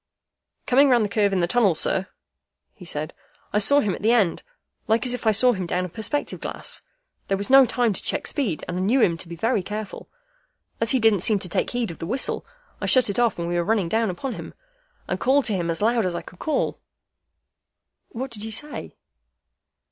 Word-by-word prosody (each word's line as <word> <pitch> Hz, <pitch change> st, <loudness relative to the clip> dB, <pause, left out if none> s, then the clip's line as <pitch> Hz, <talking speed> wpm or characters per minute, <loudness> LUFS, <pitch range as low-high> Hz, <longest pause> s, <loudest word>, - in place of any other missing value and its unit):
"Coming 275 Hz, +3 st, +4 dB
round 240 Hz, -4 st, +4 dB
the -, -, -4 dB
curve 205 Hz, -1 st, +2 dB
in 190 Hz, -2 st, +1 dB
the 170 Hz, -, +1 dB
tunnel, 205 Hz, -4 st, +3 dB
sir," 190 Hz, +4 st, 0 dB, 0.7 s
he 185 Hz, -, -14 dB
said, 155 Hz, -2 st, -5 dB, 0.4 s
"I 210 Hz, -, +3 dB
saw 285 Hz, +8 st, +6 dB
him 205 Hz, -3 st, -1 dB
at -, -, -7 dB
the 220 Hz, -, +3 dB
end, 210 Hz, -8 st, +2 dB, 0.5 s
like 225 Hz, +2 st, +2 dB
as 250 Hz, -, +2 dB
if 245 Hz, -2 st, -4 dB
I -, -, +6 dB
saw 245 Hz, +4 st, +4 dB
him 185 Hz, -4 st, -4 dB
down 180 Hz, +1 st, -1 dB
a -, -, -7 dB
perspective 220 Hz, -, -3 dB
glass. -, -, -3 dB, 0.5 s
There 195 Hz, -, 0 dB
was 200 Hz, +5 st, -4 dB
no 270 Hz, -1 st, +8 dB
time 240 Hz, -3 st, +1 dB
to -, -, -4 dB
check -, -, -2 dB
speed, 230 Hz, -, 0 dB
and 175 Hz, -, -4 dB
I -, -, -1 dB
knew 215 Hz, +8 st, +2 dB
him 175 Hz, -8 st, +3 dB
to 170 Hz, -, -6 dB
be 170 Hz, -, -7 dB
very 220 Hz, +4 st, 0 dB
careful. 210 Hz, +2 st, -7 dB, 0.7 s
As 230 Hz, -, +1 dB
he 260 Hz, -, +2 dB
didn't 220 Hz, -3 st, +4 dB
seem 210 Hz, +4 st, +2 dB
to 185 Hz, -2 st, -6 dB
take -, -, -1 dB
heed 240 Hz, -5 st, -2 dB
of 165 Hz, -, -11 dB
the 165 Hz, -, -5 dB
whistle, 255 Hz, +7 st, 0 dB, 0.4 s
I -, -, -2 dB
shut 255 Hz, -5 st, +4 dB
it 200 Hz, -, -3 dB
off 240 Hz, -2 st, +2 dB
when 170 Hz, 0 st, -3 dB
we 175 Hz, 0 st, -1 dB
were 175 Hz, -, +1 dB
running 200 Hz, -3 st, 0 dB
down 225 Hz, +1 st, +1 dB
upon 235 Hz, +8 st, -4 dB
him, -, -, -9 dB, 0.5 s
and -, -, -2 dB
called 270 Hz, +2 st, +2 dB
to 215 Hz, -, 0 dB
him 170 Hz, -2 st, -2 dB
as 165 Hz, +4 st, -2 dB
loud 230 Hz, +1 st, +2 dB
as 175 Hz, -, -3 dB
I -, -, -4 dB
could 180 Hz, -, -14 dB
call." 310 Hz, -, -1 dB, 1.3 s
"What 255 Hz, +2 st, -6 dB
did 210 Hz, -2 st, -2 dB
you 220 Hz, -, -4 dB
say?" 295 Hz, +7 st, -2 dB
215 Hz, 230 wpm, -23 LUFS, 185-245 Hz, 1.3 s, no